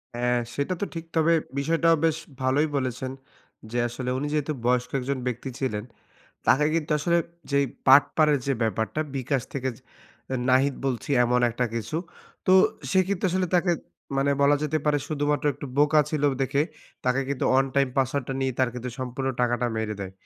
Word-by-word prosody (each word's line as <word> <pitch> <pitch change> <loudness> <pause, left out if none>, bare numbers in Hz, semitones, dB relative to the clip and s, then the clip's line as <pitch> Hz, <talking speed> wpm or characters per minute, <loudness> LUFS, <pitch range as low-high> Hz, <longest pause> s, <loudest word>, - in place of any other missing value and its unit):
হ্যাঁ 125 0 +1 0.2
সেটা 145 +6 -1
তো - - +1
ঠিক। 165 0 -6
তবে 165 +1 +4 0.3
বিষয়টাও 165 +3 +3
বেশ 160 -1 +2 0.2
ভালোই 135 +4 +2
বলেছেন। 130 0 -2 0.6
যে 120 - -2
আসলে 125 +1 -5
উনি 145 +2 -2
যেহেতু 150 0 0
বয়স্ক 125 0 +2
একজন 135 +2 -2
ব্যক্তি 125 +2 -3
ছিলেন, 110 -6 -2 0.6
তাকে 150 +2 +5
কিন্তু 155 -2 -1
আসলে 170 +3 +2 0.3
যেই 140 0 +3 0.2
বাটপারের 145 +2 +5
যে 140 - +2
ব্যাপারটা 110 +6 -1
bKash 135 -1 -1
থেকে 130 -1 -1
যে 130 - -21 0.5
অ্যা 130 - -1
নাহিদ 135 +1 +3
বলছি 130 +2 -2
এমন 125 +1 +2
একটা 125 +2 -1
কিছু। 115 +7 -3 0.5
তো 185 - +5 0.4
সে 190 - +3
কিন্তু 200 -1 -2
আসলে 185 0 +1
তাকে 175 0 +3 0.5
মানে 140 +1 +2
বলা 145 +1 +5
যেতে 155 +1 0
পারে 145 -1 +3
শুধুমাত্র 145 -1 0
একটু 145 - -7
বোকা 150 +1 +5
ছিল 150 -2 -1 0.2
দেখে, 140 +2 +1 0.4
তাকে 125 +2 +2
কিন্তু 140 - -1
ওয়ান 135 +1 +4
টাইম 140 -1 +3
পাসওয়ার্ড 135 0 +1
টা - - -1
নিয়ে 130 -1 0
তার 130 -1 +3
কিন্তু 125 +1 -5
সম্পূর্ণ 130 +1 -3
টাকাটা 120 0 +1
মেরে 110 -1 -2
দেয়। 95 -1 -5
135 Hz, 180 wpm, -26 LUFS, 125-150 Hz, 0.6 s, তাকে